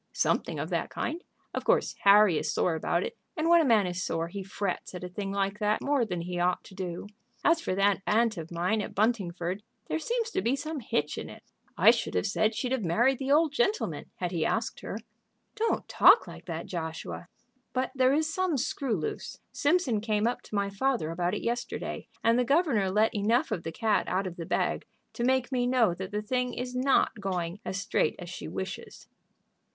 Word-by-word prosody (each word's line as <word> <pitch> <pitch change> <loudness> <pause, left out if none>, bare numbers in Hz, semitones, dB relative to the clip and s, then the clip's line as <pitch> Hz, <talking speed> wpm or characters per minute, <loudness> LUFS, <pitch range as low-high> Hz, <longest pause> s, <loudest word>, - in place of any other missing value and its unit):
"Something - - 0
of - - -4
that - - -1
kind. 340 +2 -3 0.3
Of - - -3
course - - +2
Harry 200 -4 +7
is - - -2
sore 175 - +1
about 170 +2 0
it, - - -5 0.2
and 315 +1 +1
when 340 0 +7
a - - +3
man 225 -7 +4
is 180 0 -3
sore 165 -2 -2
he 200 +3 -5
frets 195 -1 -4
at 180 - -6
a - - -3
thing 195 +2 -4
like 195 +1 -1
that 210 0 +1
more 280 -4 +1
than 180 -5 -3
he 175 +1 -4
ought 180 +1 +1
to 200 - -14
do. 185 -2 -5 0.4
As 330 0 +4
for 185 - -1
that 195 0 +3
aunt 225 +1 +3
of 165 -2 -7
mine 180 +6 0
at - - -6
Buntingford, 190 -4 0 0.3
there 320 - -1
seems 465 +5 -1
to - - 0
be 235 +7 +1
some 305 +2 -4
hitch 150 - -1
in - - -6
it. - - -12 0.3
I - - +8
should - - -3
have 90 - +1
said 215 +1 +1
she'd 250 +3 -2
have 260 -4 0
married 235 +10 +2
the 270 0 -1
Old 305 0 +4
Gentleman 395 - 0
had - - -3
he - - 0
asked - - -1
her." - - -5 0.6
"Don't 445 +2 -1
talk 395 +6 +6
like - - -11
that, 170 -1 -4
Joshua." 160 0 -5 0.4
"But 255 0 -1
there 260 -1 +4
is 310 +2 +2
some 370 -5 +1
screw 260 -1 -1
loose. 155 -5 -4
Simpson 285 - +1
came 215 -1 0
up 240 - 0
to - - -8
my 200 0 0
father 225 -5 0
about 175 +3 -1
it - - -4
yesterday, 240 +1 -3 0.2
and 230 +2 +4
the - - +3
governor 265 - +2
let 215 +3 +2
enough 225 +8 +1
of 170 - -1
the 165 - -5
cat 215 +4 +1
out 190 +2 0
of 180 -2 -5
the 165 -2 -6
bag - - 0 0.3
to 235 - -3
make 260 +1 +2
me 245 -1 +1
know 245 -7 +3
that 185 +2 -6
the 210 0 -3
thing 250 +2 -1
is 250 0 -4
not 260 +2 +3
going 180 -1 -2
as 190 - -3
straight 200 -6 +1
as 175 0 -8
she - - -6
wishes." 190 0 -6
210 Hz, 215 wpm, -29 LUFS, 185-260 Hz, 0.6 s, I